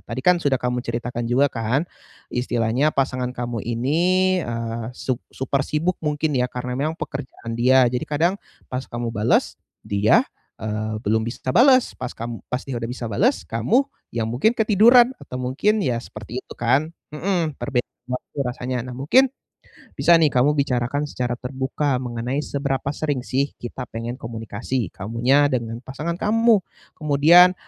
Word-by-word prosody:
tadi 125 +3 -6
kan 180 -1 +5
sudah 140 -2 +2
kamu 125 0 -1
ceritakan 120 0 -3
juga 130 +4 +4
kan, 120 +7 0 0.5
istilahnya 120 +2 +1
pasangan 130 -3 -1
kamu 120 -2 -3
ini, 125 +7 0 0.4
eee, 115 -2 -4
su 130 - -1 0.2
super 135 +1 -1
sibuk, 165 +5 -1
mungkin 150 -1 0
ya, 125 - +1
karena 125 0 -4
memang 155 +5 -1
pekerjaan 130 -5 -6
dia. 130 +2 +5
Jadi 125 +1 -1
kadang, 165 +6 +2 0.3
pas 125 +1 -4
kamu 120 -1 -3
bales, 110 +2 +1 0.3
dia, 100 +1 +4 0.4
eee, 110 0 -3
belum 110 0 +1
bisa 120 +2 -6
bales, 255 - +5
pas 125 -1 -5
kamu 115 0 -7
pas 125 - 0
dia 135 -3 -5
udah 115 -1 -3
bisa 120 -2 -5
bales, 235 - +1
kamu 115 - +2 0.3
yang 115 -2 -1
mungkin 125 - +2
ketiduran 235 +3 +5
atau 125 - -7
mungkin 145 +13 +1
ya, 125 -9 0
seperti 115 +1 -7
itu - - -11
kan. 135 +7 +2 0.2
Mhm, 165 -2 -1
perbedaan 125 -3 -2 0.2
waktu 125 +3 -6
rasanya. 125 -1 -3
Nah, - - -6
mungkin, 245 - +4 0.7
bisa 150 +5 +5
nih 160 -2 +4
kamu 135 +3 +3
bicarakan 140 +1 0
secara 125 -2 -2
terbuka 130 +2 -1
mengenai 125 +2 -3
seberapa 140 -1 -2
sering 145 -4 -1
sih 135 +2 0
kita 125 +1 -6
pengen 115 +1 -4
komunikasi, 115 -1 -4
kamunya 120 +8 +2
dengan 115 -2 -3
pasangan 150 +6 -4
kamu. 225 0 +3 0.4
Kemudian, 160 +4 +6
130 Hz, 155 wpm, -22 LUFS, 120-150 Hz, 0.7 s, Kemudian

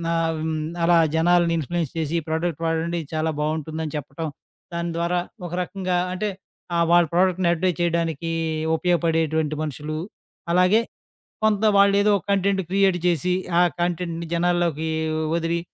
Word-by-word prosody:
ఆహ్, 165 -1 0 0.4
అలా 170 0 +5 0.2
జనాలని 170 +1 +3
ఇన్‌ఫ్లుయెన్స్ 165 0 -2
చేసి 160 -1 -2
ఈ - - -9
ప్రోడక్ట్ 160 0 -1
వాడండి 165 +1 -1
చాలా 160 0 0
బావుంటుందని 155 0 -3
చెప్పటం. 150 +3 -5 0.5
దాని 170 0 -2
ద్వారా 170 +1 +1 0.3
ఒక 170 - -9
రకంగా 185 -1 -2 0.2
అంటే 210 +3 -2 0.5
ఆహ్, 170 0 +3
వాళ్ళ 175 0 +6
ప్రోడక్ట్‌ని 180 0 +2
అడ్వటైజ్ 175 +1 -1
చేయడానికి 165 -1 0 0.4
ఉపయోగపడేటువంటి 160 -3 +1
మనుషులు. 150 +1 -4 0.5
అలాగే 180 +5 +4 0.6
కొంత 215 -1 +2
వాళ్ళేదో 200 +1 +5
ఒక - - -10
కంటెంట్ 195 0 +2
క్రియేట్ 195 -1 +3
చేసి 175 +1 +1 0.3
ఆ - - +6 0.2
కంటెంట్‌ని 170 -1 -2
జనాల్లోకి 170 -2 +1 0.5
వదిలి, 170 0 0
170 Hz, 130 wpm, -23 LUFS, 160-180 Hz, 0.6 s, వాళ్ళ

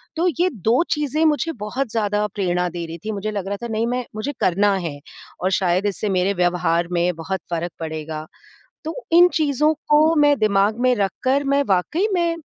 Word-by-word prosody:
तो 335 +3 +1
ये 360 +1 +3 0.2
2 235 +8 +4
चीज़ें 300 +1 0
मुझे 315 +2 +1
बहुत 255 +5 -2
ज़्यादा 210 -2 0
प्रेरणा 180 -3 0
दे 170 0 -5
रही 165 +1 -7
थी, 220 - -2
मुझे 210 +1 -3
लग 200 -3 -4
रहा 200 +1 -3
था - - -2
नहीं 225 +1 0
मैं 250 +1 -2
मुझे 255 +7 -3
करना 200 +3 +3
है 145 -3 -5 0.4
और 185 +1 0
शायद 185 0 +1
इससे 205 +1 -2
मेरे 190 +1 +1
व्यवहार 175 -2 +1
में 175 0 +1
बहुत 175 +4 -4
फ़र्क 170 +1 -2
पड़ेगा। 155 -1 -5 0.6
तो 320 - -4 0.2
इन 350 +1 +8
चीज़ों 300 -1 +2 0.2
को 305 +2 +5
मैं 290 -1 +5
दिमाग 210 0 +2
में 255 0 +3
रखकर 255 +8 0
मैं 280 +1 +2
वाक़ई 200 - +1
में, 340 -2 +1
210 Hz, 190 wpm, -21 LUFS, 180-285 Hz, 0.6 s, इन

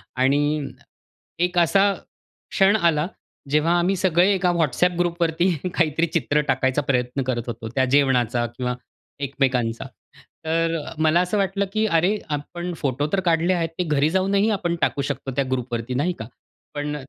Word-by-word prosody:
आणि 145 +4 +2 0.8
एक 180 0 -5
असा, 195 +4 +4 0.6
क्षण 195 +2 +4
आला 170 -5 +2 0.4
जेव्हा 160 +4 +3
आम्ही 185 +3 +1
सगळे 180 +1 +3
एका 185 -2 +1
WhatsApp 170 +3 +1
ग्रुप 175 0 -1
वरती 170 +2 +2 0.2
काहीतरी 165 0 +1
चित्र 150 -2 +1
टाकायचा 130 +1 +1
प्रयत्न 125 0 -1
करत 125 -2 -2
होतो, 115 -1 -5
त्या 130 -1 +3
जेवणाचा 125 -4 +2
किंवा 125 -1 -2 0.5
एकमेकांचा. 130 -4 -1 0.6
तर 165 +1 +1 0.3
मला 160 +2 +4
असं 180 +3 -1
वाटलं, 200 0 0
की 215 0 +1
अरे! 185 +3 +2
आपण 175 +4 -4
फोटो 140 +1 -1
तर 195 - +3
काढले 170 +2 +3
आहेत 165 -2 -1
ते - - +2
घरी 150 -2 +1
जाऊनही 195 +4 +2
आपण 180 -5 -1
टाकू 140 - +1
शकतो 135 -1 -4
त्या 140 - +2
ग्रुप 125 -1 -2
वरती 115 +2 -3
नाही 160 +8 0
का? 110 - -5 0.5
पण 150 0 -3
160 Hz, 160 wpm, -23 LUFS, 135-180 Hz, 0.8 s, असा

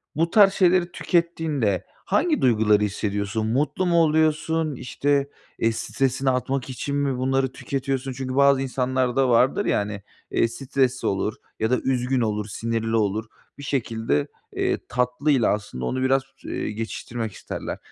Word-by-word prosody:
bu 165 +2 +1
tarz 200 -1 +6
şeyleri 180 -2 +3
tükettiğinde 160 - 0 0.2
hangi 300 - +1
duyguları 105 -4 +4
hissediyorsun? 105 +1 -2
Mutlu 145 +10 0
mu 170 -1 +4
oluyorsun? 155 0 +1
İşte, 140 +3 0 0.3
eee, 115 - +2
stresini 130 +3 -1
atmak 130 +1 -1
için 140 +3 -3
mi 140 -3 0
bunları 130 0 +1
tüketiyorsun? 135 -1 -3
Çünkü 130 0 -4
bazı 140 -1 +5
insanlar 130 -1 0
da 135 -2 +3
vardır 125 +3 +3
ya, - - +2
hani, 100 -1 -4 0.3
eee, - - +3
stresli 130 +1 -1
olur 100 +2 -1 0.2
ya 110 - +1
da 125 - +3
üzgün 130 -1 +1
olur, 105 -2 -1
sinirli 115 +1 -2
olur. 110 0 0 0.3
Bir 140 - -9
şekilde, 110 - -1 0.3
eee, - - +1
tatlıyla 125 +1 +2
aslında 80 -12 -5
onu 130 - -1
biraz, 135 0 +3 0.2
ııı, - - -3
geçiştirmek 110 +1 -4
isterler. - - -6
130 Hz, 145 wpm, -24 LUFS, 115-140 Hz, 0.3 s, tarz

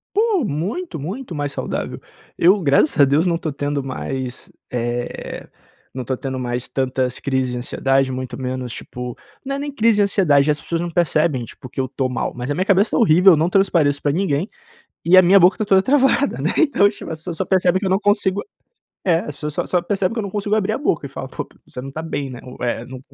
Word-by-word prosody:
Pô, 425 - +2
muito, 195 - -3
muito 185 - -6
mais 145 -1 -3
saudável. - - -4 0.4
Eu 190 +4 +4
graças 145 -1 +2
a - - +9
Deus 145 +5 +2
não 170 -1 +1
tô 160 - -3
tendo 145 0 -2
mais, 130 -1 -5 0.2
eh, 120 0 -4 0.5
não 130 -1 -4
tô 130 - -1
tendo 130 -1 -4
mais 125 0 -3
tantas 130 -1 -1
crises 130 -2 -1
de - - -3
ansiedade, 135 +1 0
muito 130 0 -5
menos 130 -2 -4
tipo 125 -1 -7 0.3
não 275 +1 -2
é - - -5
nem 290 0 -4
crise 225 -4 +3
de 210 - +4
ansiedade, 155 -8 +3
as 150 0 0
pessoas 170 0 -2
não 175 - -3
percebem 155 -6 +1
tipo - - -12
que 135 - -5
eu 130 - -1
tô 130 +1 -2
mal, 125 - -2
mas 125 +3 -4
a - - 0
minha 185 - 0
cabeça 195 +2 +3
tá - - +2
horrível, 185 -3 +6
eu 160 - +5
não 165 +3 +2
transpareço 170 -7 +2
pra 145 - +1
ninguém, 170 +1 0 0.6
e 175 +2 +6
a 185 - +10
minha 190 +3 +6
boca 180 +1 +5
está 215 - -2
toda 195 -2 +5
travada, 270 +4 +2
né, - - +1
então 280 -11 +4
tipo 205 - -9
as 160 - -5
pessoas 165 +1 -5
só 190 - -1
percebem 185 -1 +2
que 195 - -4
eu - - +1
não 190 +2 +2
consigo 205 -1 +1 0.6
é 170 -3 +3
as 150 - -7
pessoas 150 -1 -5
só - - -2
só 180 - +1
percebem 195 +2 -1
que 235 - -3
eu 215 - -2
não 200 - -4
consigo 205 0 -2
abrir 215 0 0
a - - -1
boca, 170 - -1
e 140 - -6
fala: 135 - -6
"Pô - - -6 0.2
você - - -9
não 135 - -7
está 155 +4 -6
bem, 145 -4 -3
né?" 125 -2 -8
é - - -15
o 125 0 -9
é 120 -1 -2
não, 130 0 -9
160 Hz, 245 wpm, -20 LUFS, 135-195 Hz, 0.6 s, a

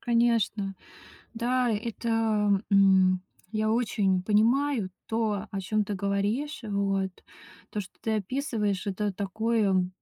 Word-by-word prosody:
Конечно, 230 -4 +1 0.6
да, 245 +1 +1
это, 230 +2 -3 0.6
м, 190 -2 +5 0.3
я 215 0 +1
очень 205 -5 +1
понимаю 225 +2 +2 0.2
то, 220 -2 -1
о 195 - -3
чём 210 +2 0
ты 205 - -3
говоришь, 205 +10 -1
вот. 195 -2 0 0.6
То, 210 - -3
что 185 - -9
ты 220 - -1
описываешь, 215 -3 -2
это 200 +1 -1
такое, 200 -1 +1
210 Hz, 115 wpm, -27 LUFS, 195-230 Hz, 0.6 s, м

